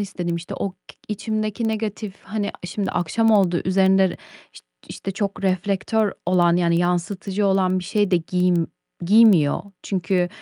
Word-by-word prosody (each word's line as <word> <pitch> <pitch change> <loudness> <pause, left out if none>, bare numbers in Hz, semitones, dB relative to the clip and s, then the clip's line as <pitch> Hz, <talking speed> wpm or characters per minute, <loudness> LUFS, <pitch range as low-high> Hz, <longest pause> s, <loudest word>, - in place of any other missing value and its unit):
istedim. 175 -4 -3
İşte, 170 +1 -7
o 200 - -3
k - - -38 0.3
içimdeki 215 +1 -2
negatif, 215 -2 -4
hani, 205 0 -3
a - - -6
şimdi 195 +2 -3
akşam 225 +7 +1
oldu, 190 -5 +3
üzerinde 190 +1 +4
r - - -7 0.4
işt - - -15 0.2
işte 195 - -6
çok 200 0 -3
reflektör 195 +3 0
olan, 175 -1 +3
yani 170 -1 +2
yansıtıcı 185 +3 -1
olan 185 -1 +2
bir 180 - -6
şey 205 +1 0
de 180 - +4
giym 175 0 +1 0.4
giymiyor. 185 -6 +5 0.2
Çünkü, 180 -1 0
190 Hz, 155 wpm, -22 LUFS, 175-205 Hz, 0.4 s, giymiyor